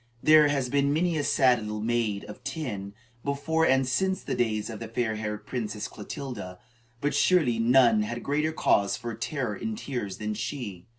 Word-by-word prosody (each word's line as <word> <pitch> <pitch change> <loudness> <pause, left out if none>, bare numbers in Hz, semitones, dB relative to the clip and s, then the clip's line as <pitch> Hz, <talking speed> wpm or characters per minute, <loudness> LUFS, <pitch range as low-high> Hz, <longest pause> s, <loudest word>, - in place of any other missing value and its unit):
There 155 -1 +7
has 140 -3 0
been 140 +2 +2
many 170 +3 +1
a - - 0
sad 130 -3 +4
little 105 0 -4
maid 110 -2 0
of 105 - -11
ten, 105 -11 -5 0.3
before 160 +3 +1
and 130 0 +3
since 190 +9 0
the - - -3
days 110 -3 0
of 110 -3 -7
the 115 - -6
fair 115 0 -1
haired 105 -1 -4
Princess 110 -4 -4
Clotilda, 105 -5 -7 0.4
but 145 0 0
surely 145 -5 +3
none 120 -2 +5
had 120 +3 -4
greater 150 +3 0
cause 100 -10 +2
for 120 -1 -5
terror 125 +4 -3
and 220 -1 -4
tears 120 - -4
than 105 0 -3
she. 105 -4 -5
120 Hz, 180 wpm, -27 LUFS, 105-145 Hz, 0.4 s, There